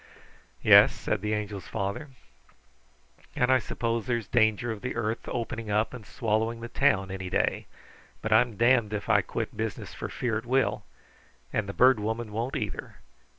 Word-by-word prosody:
"Yes," - - +7
said 105 - -2
the 105 +1 0
Angel's 105 -3 -5
father, 100 +10 -3 1.3
"and 125 +1 +2
I 130 - +5
suppose 115 0 -2
there's 120 -3 -1
danger 110 0 +2
of 105 -2 -6
the 125 - -4
earth 115 0 -2
opening 115 -2 -4
up 105 +3 +1
and 115 -5 -9
swallowing 110 +1 -1
the 120 +1 -7
town 100 -10 +2
any 95 -1 -5
day, - - 0 0.6
but 105 - +1
I'm 115 -1 +3
damned 115 -2 +3
if 105 -1 -4
I - - +5
quit - - -4
business - - -4
for - - -6
fear 115 -3 -1
it 110 - -13
will, 130 +2 +1 0.7
and 105 -2 -1
the - - -1
Bird 130 0 +5
Woman 110 +1 -3
won't, 115 +5 -3
either. - - -4
110 Hz, 170 wpm, -27 LUFS, 105-120 Hz, 1.3 s, Yes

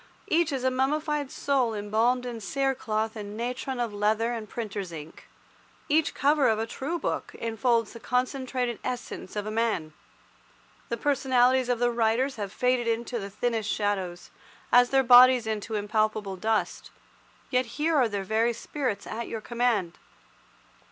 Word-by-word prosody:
Each 330 -1 +2
is 265 -2 -2
a 260 - +2
mummified 295 +2 0
soul 260 -6 0
embalmed 225 +5 +1
in 235 -2 -5
cere 270 +5 0
cloth 220 -3 -2
and 210 -1 -7
natron 250 +2 -3
of 235 -3 -2
leather 215 +3 +1
and 220 -3 -6
printer's 205 -5 -5
ink. 155 -1 -10 0.6
Each 310 +1 +2
cover 285 -2 +3
of 220 - +2
a 220 - -1
true 275 +8 -4
book - - -3
enfolds 230 0 0
the 230 - -9
concentrated 250 -1 -1
essence 245 -6 -5
of 210 -1 -2
a 215 - -4
man. 215 -9 -1 1.0
The 235 - -2
personalities 260 -1 +2
of 245 - +2
the 240 +1 +2
writers 235 +3 +1
have 200 -2 -4
faded 250 +2 +1
into 235 +1 -1
the 200 -1 -6
thinnest 220 0 -2
shadows, 190 -5 -2 0.4
as 245 0 +6
their 270 0 +3
bodies 250 0 +8
into 220 0 -3
impalpable 210 -1 0
dust, 220 +3 -1 0.6
yet 255 -1 +2
here 315 +2 +1
are 255 -5 +4
their 200 -2 -3
very 225 +4 +1
spirits 245 -2 -3
at 230 +1 -5
your 225 - -4
command. 230 -7 -1
235 Hz, 160 wpm, -27 LUFS, 215-255 Hz, 1.0 s, bodies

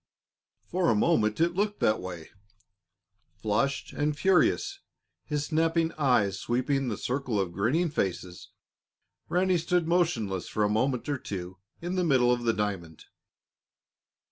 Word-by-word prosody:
For 180 -1 0
a - - +3
moment 110 -3 +2
it 170 +1 +2
looked 205 +3 -1
that 110 - +2
way. 90 -3 -8 1.0
Flushed 115 +7 -1
and 145 0 -1
furious, 190 - +2 0.5
his 150 -1 -2
snapping 165 +1 +1
eyes 125 - +1
sweeping 130 +4 0
the 110 -4 -2
circle 125 -4 -2
of 95 -3 -1
grinning 130 - 0
faces, 90 - -3 0.8
Ranny 180 0 +2
stood 175 0 0
motionless 120 - 0
for 105 - -1
a 105 - +2
moment 125 +4 0
or 145 -2 -1
two 95 -3 -6 0.2
in 180 +2 -2
the 180 - +2
middle 130 -6 +4
of 120 -1 -3
the 115 - +3
diamond. 95 -7 -4
130 Hz, 140 wpm, -28 LUFS, 105-165 Hz, 1.0 s, middle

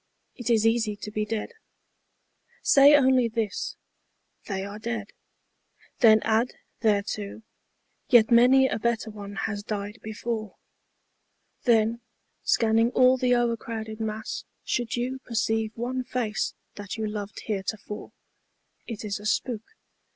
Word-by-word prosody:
It 245 -1 -5
is 225 -2 +3
easy 225 -2 +2
to 210 +1 -8
be 215 0 -1
dead. 225 - -3 1.1
Say 280 +1 +7
only 260 -3 +4
this, 220 -3 -3 0.3
" - - -45
They 195 -2 -3
are 205 +1 -7
dead." 220 -2 -4 0.9
Then 220 -3 +7
add 225 +3 +1 0.2
thereto, 210 0 -1 0.3
" - - -46
Yet 235 -3 +6
many 255 +3 +6
a - - -2
better 230 0 -1
one 205 -1 -8
has 205 -2 -3
died 205 +1 -5
before." 220 -1 -4 1.1
Then, 230 -1 +3 0.4
scanning 225 0 +3
all 255 0 +6
the 250 -1 +2
o'ercrowded 230 -2 -2
mass, 220 0 -4 0.2
should 240 -2 -1
you 255 +2 -2
Perceive 220 -2 -1
one 255 +2 -2
face 230 -4 -2 0.2
that 205 +1 -6
you 220 - -2
loved 210 -1 -5
heretofore, 210 0 -4 0.8
It 225 -2 -6
is 205 0 -3
a 210 - -11
spook. 220 +1 0
225 Hz, 130 wpm, -26 LUFS, 210-240 Hz, 1.1 s, Say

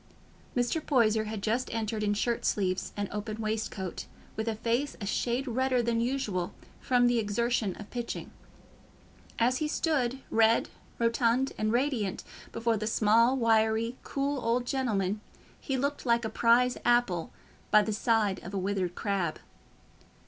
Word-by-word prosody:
Mr. 245 +6 0
Poyser 220 -7 +3
had 215 -2 -5
just 235 +4 0
entered 220 -1 -2
in 205 -1 +1
shirt 235 +3 -1
sleeves 185 -2 0
and 205 0 -1
open 210 +1 -4
waistcoat, 215 -4 -3 0.3
with 220 +1 -3
a 225 - 0
face 235 +6 -1
a 205 - -4
shade 240 +6 -1
redder 255 0 +1
than 230 0 +1
usual, 230 -8 -2 0.2
from 245 -1 +3
the 245 -1 +3
exertion 220 -1 0
of 210 - -9
"pitching." 240 -1 -5 1.1
As 245 +2 +2
he 305 - -1
stood, 275 -5 0
red, 225 0 +4 0.3
rotund, 235 +2 +2
and 215 0 0
radiant, 240 -6 0 0.3
before 230 0 0
the 215 +1 -3
small, 230 +4 +4
wiry, 225 0 +2
cool 275 -1 -2
old 240 +2 +1
gentleman, 215 -7 -1 0.4
he 270 -2 -2
looked 280 +2 -1
like 235 -2 +2
a - - -1
prize 240 +3 +3
apple 240 -8 +2 0.4
by 215 - +6
the 215 - -2
side 215 -3 +1
of 190 +3 -7
a - - 0
withered 190 -2 -1
crab. 190 -6 -1
230 Hz, 150 wpm, -29 LUFS, 210-245 Hz, 1.1 s, by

